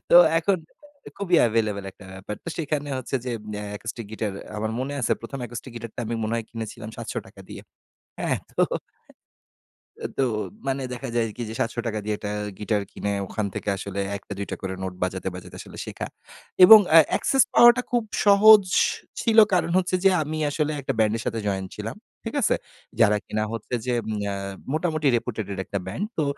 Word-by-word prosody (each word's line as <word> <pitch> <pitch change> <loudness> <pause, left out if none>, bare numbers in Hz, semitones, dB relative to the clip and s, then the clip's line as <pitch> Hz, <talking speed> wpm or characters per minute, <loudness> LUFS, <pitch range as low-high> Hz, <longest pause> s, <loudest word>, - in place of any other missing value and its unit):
তো - - +9 0.2
এখন 190 +3 +2 0.6
খুবই 185 -3 +2
এভেইলেবল 110 -3 0
একটা 100 - -16
ব্যাপার। 95 +2 -6
তো - - -5
সেখানে 150 -2 -2
হচ্ছে 130 +1 -6
যে, 125 - -3 0.3
আ - - -5
অ্যাকুস্টিক 110 +2 -6
গিটার 110 -2 -3 0.2
আমার 110 +1 -2
মনে 135 +2 -3
আছে 120 - +2
১ম 125 +4 -7
অ্যাকুস্টিক 120 +1 -7
গিটারটা 115 0 -7
আমি 115 - -2
মনে 110 +1 -1
হয় 115 -1 -4
কিনেছিলাম 110 -1 -6
৭০০ - - -6
টাকা - - -15
দিয়ে। - - -9 0.6
এ্যাঁ - - +1 0.2
তো, - - +5 1.5
তো 135 - +3 0.4
মানে 135 0 0
দেখা 120 - -5
যায় 115 -1 +2
কি? - - -6
যে, - - -5
৭০০ 115 - -1
টাকা 110 -1 -2
দিয়ে 105 0 -1
একটা 105 -1 -4 0.3
গিটার 105 -1 0
কিনে, 100 0 -2
ওখান 105 -2 -2
থেকে - - -3
আসলে 100 0 -5 0.2
১ 100 - -6
টা, 100 - -4
২ 100 - -3
টা - - -1
করে 95 -1 -3
নোট 95 -1 -3
বাজাতে, 95 +1 -2
বাজাতে 90 - -10
আসলে - - -12
শেখা। - - -5 0.6
এবং 220 +2 +11 0.2
আ - - +12
অ্যাক্সেস 270 -3 +4
পাওয়াটা 240 +1 +8
খুব 240 -2 +2 0.2
সহজ 205 +1 +8 0.6
ছিল। 225 -1 +2 0.2
কারণ 175 -2 +2
হচ্ছে 185 0 +1
যে, 195 - +7
আমি 155 +1 -4
আসলে 150 +1 0
একটা - - -2
ব্যান্ডের 110 +1 +2
সাথে 115 - -1
জয়েন 95 -1 -1
ছিলাম। - - -5 0.3
ঠিক - - -5
আছে। - - +3 0.4
যারা 105 -2 +5
কিনা 110 0 -1
হচ্ছে 115 +2 -6
যে, 125 - 0 0.4
আ - - -3 0.4
মোটামুটি 155 -2 0
রেপুটেডেট 105 -4 -4
একটা 100 - -3
ব্যান্ড। 190 - -3
তো, 155 - +2
115 Hz, 185 wpm, -25 LUFS, 105-155 Hz, 1.5 s, আ